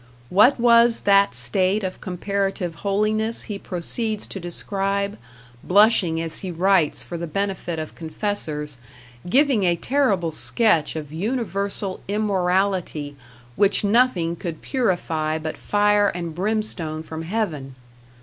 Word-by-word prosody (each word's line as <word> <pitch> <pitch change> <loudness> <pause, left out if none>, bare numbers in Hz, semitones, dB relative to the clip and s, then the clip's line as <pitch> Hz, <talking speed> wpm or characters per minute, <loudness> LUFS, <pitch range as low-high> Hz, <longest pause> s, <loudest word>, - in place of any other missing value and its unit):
What 215 +8 +5
was 235 0 +5
that 200 -8 +4
state 185 - +1
of 185 -1 -5
comparative 195 -1 -2
holiness 215 +3 0
he 205 -2 -6
proceeds 210 +5 -2
to 195 - -6
describe, 195 +3 -2 0.5
blushing 195 -4 +4
as 165 -1 -4
he 190 - -5
writes, 180 -2 +2
for 170 - -6
the 170 - -4
benefit 190 -1 -3
of 155 -1 -5
confessors, 155 - -4 0.5
giving 265 -2 +3
a 175 -2 +3
terrible 200 - +1
sketch 170 - +1
of 150 -2 -6
universal 200 -1 -2
immorality 190 -6 0 0.4
which 200 0 +3
nothing 200 -6 +2
could 170 -2 -6
purify 165 - -1
but 155 0 -5
fire 205 0 +2
and 170 -4 -4
brimstone 180 -5 -1
from 160 0 -7
heaven. 165 - -3
195 Hz, 120 wpm, -22 LUFS, 165-210 Hz, 0.5 s, What